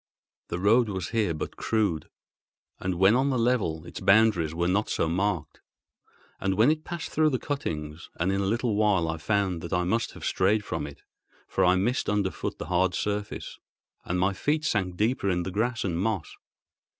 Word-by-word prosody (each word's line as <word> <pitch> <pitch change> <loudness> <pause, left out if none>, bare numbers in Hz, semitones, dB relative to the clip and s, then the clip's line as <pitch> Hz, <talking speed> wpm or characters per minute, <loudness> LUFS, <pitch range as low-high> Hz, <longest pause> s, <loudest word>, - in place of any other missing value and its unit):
The - - -3
road 110 +5 +4
was 95 -2 -3
here 105 -8 0
but 75 - -5
crude, 105 -8 0 0.7
and 95 -1 -2
when 95 +4 +5
on 135 +2 +2
the 130 - +1
level 110 -10 0
its - - -8
boundaries 100 -6 +4
were 85 +1 0
not 100 +4 +1
so - - 0
marked, 85 -3 -1 0.8
as 95 0 0
when 115 +8 +5
it 155 0 -2
passed 170 -2 -5
through 155 0 +3
the 130 - 0
cuttings; 80 - -4
and 90 +3 +1
in 100 0 0
a - - 0
little 115 +2 0
while 100 -5 +2
I 80 0 -2
found 95 0 0
that 85 - -5
I 90 -1 +2
must 110 +6 0
have - - -8
strayed 100 +3 +2
from 75 - -3
it, 70 - -12 0.4
for - - 0
I 90 +1 +5
missed 115 +8 0
underfoot 100 -2 -1
the - - -6
hard 90 +1 +1
surface, 105 0 -3 0.4
and 90 +1 -2
my 95 +2 +2
feet 150 +9 0
sank 95 - 0
deeper 110 -1 +1
in 90 -1 0
the 95 - -4
grass 110 +4 -1
and 85 -3 -1
moss. 100 -3 -2
100 Hz, 195 wpm, -27 LUFS, 90-110 Hz, 0.8 s, when